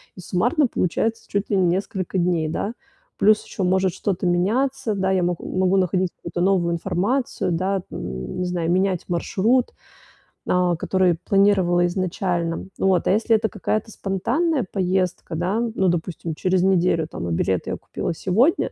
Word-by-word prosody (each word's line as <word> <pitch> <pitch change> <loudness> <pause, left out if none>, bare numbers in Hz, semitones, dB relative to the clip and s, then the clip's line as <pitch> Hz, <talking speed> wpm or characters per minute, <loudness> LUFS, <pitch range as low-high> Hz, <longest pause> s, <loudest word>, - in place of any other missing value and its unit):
И - - -12
суммарно 245 - +1
получается 225 +4 -1
чуть 200 +1 -2
ли 200 - +3
не 185 -2 +3
несколько 190 +1 -2
дней, 170 -3 +1
да. 200 +7 -2 0.5
Плюс 215 +1 +4
еще 195 - -4
может 190 +1 +2
что-то 190 -2 -2
меняться. 220 +7 +1
Да, 190 0 0
я 185 -2 +2
мо 175 0 +1
могу 185 0 0
находить 185 0 +1
какую-то 170 0 -6
новую 180 -2 +2
информацию, 200 +7 -1
да, 185 +2 -1
не 65 - -4
знаю, 175 -1 -1
менять 185 -1 +1
маршрут, 215 +8 +1 0.7
а, 180 -1 +2
который 180 -2 +1
планировала 190 -3 +3
изначально. 175 -2 -2
Вот, 190 -2 +2
а - - +4
если 225 +2 +3
это 220 0 0
какая-то 215 +1 -2
спонтанная 240 - 0
поездка, 185 -3 -1
да, 180 +7 0 0.2
ну, 190 -4 +2
допустим, 170 -1 -3
через 185 +3 +1
неделю, 180 -4 +2
там, 85 - -6
а - - -2
билеты 90 +2 0
я - - -1
купила - - -4
сегодня, 215 - +2
185 Hz, 155 wpm, -22 LUFS, 175-200 Hz, 0.7 s, Плюс